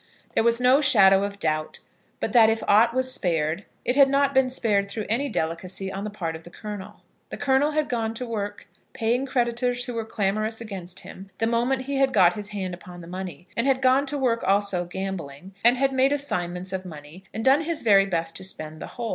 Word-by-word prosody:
There - - +3
was 235 0 +3
no 255 +3 +5
shadow 195 -8 +6
of 200 0 -4
doubt 155 -4 -2 0.4
but - - -3
that 225 -3 +7
if 225 0 -1
aught 220 +3 +5
was 260 0 +1
spared, 165 +1 -1 0.2
it 245 - +1
had 275 -1 +6
not 280 0 +2
been 265 -1 +3
spared 205 -6 0
through 210 +1 -4
any 270 +6 0
delicacy 185 +3 -3
on 195 +2 -4
the - - -3
part 170 -6 -4
of 160 - -9
the 175 - -13
Colonel. 205 +1 -8 0.3
The - - -6
Colonel 285 +2 +2
had 305 0 0
gone 225 -2 -2
to 250 - -4
work, 205 -3 -5 0.3
paying 240 +4 0
creditors 245 -1 0
who 250 - -5
were 230 -1 -2
clamorous 215 +1 -1
against 190 -5 -7
him, 195 +1 -11
the 225 - 0
moment 240 +3 +1
he 275 +1 -3
had 270 -1 +2
got 180 -4 +5
his 210 -1 -5
hand 190 -3 -4
upon 175 0 -10
the 170 - -11
money, 180 -2 -7
and 230 +3 0
had 265 -1 +3
gone 265 +2 +3
to 290 +1 -3
work 245 -4 0
also 195 -2 +1
gambling, 180 -2 -6
and 240 +2 +5
had 270 +1 +1
made 265 +1 +3
assignments 185 -10 -2
of 190 0 -3
money, 155 +1 -11
and 225 - -5
done 270 +3 +5
his 330 0 -3
very 200 -3 +5
best 165 -3 -2
to - - -8
spend 155 -4 -7
the - - -5
whole. 235 -2 -3
215 Hz, 220 wpm, -25 LUFS, 185-255 Hz, 0.4 s, that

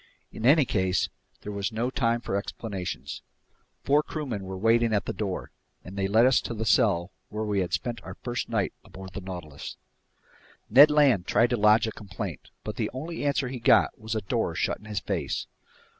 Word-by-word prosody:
In 115 - -2
any 145 +1 +6
case, 95 -4 +1 0.3
there 105 - -6
was 100 +1 -2
no 115 +3 -1
time 120 -3 +1
for 100 - -3
explanations. 95 - -4 0.6
Four 145 +2 +4
crewmen 130 -11 -4
were 95 0 -5
waiting 115 +2 +3
at 100 - 0
the - - -3
door, 100 -4 -4 0.3
and 95 - -9
they 100 -1 0
led 110 +4 +5
us 130 0 +4
to 120 - -5
the 110 +1 -3
cell 95 -5 +3 0.2
where 105 +1 -3
we 105 -2 0
had 90 -2 -1
spent 120 +5 -2
our - - -8
first 120 0 -4
night 110 -5 0
aboard 95 0 -11
the 100 - -5
Nautilus. 90 -6 -7 0.9
Ned 140 +6 +9
Land 140 -11 +4
tried 115 0 +3
to - - +3
lodge 105 +1 +5
a 110 - -2
complaint, 95 -6 -7
but - - -5
the - - -1
only 160 +6 -5
answer 140 -2 +1
he 130 -1 -5
got 115 - +4
was 110 +1 -5
a 110 - 0
door 95 - -1
shut - - 0
in - - -17
his 105 -2 -3
face. - - -2
110 Hz, 200 wpm, -27 LUFS, 95-120 Hz, 0.9 s, Ned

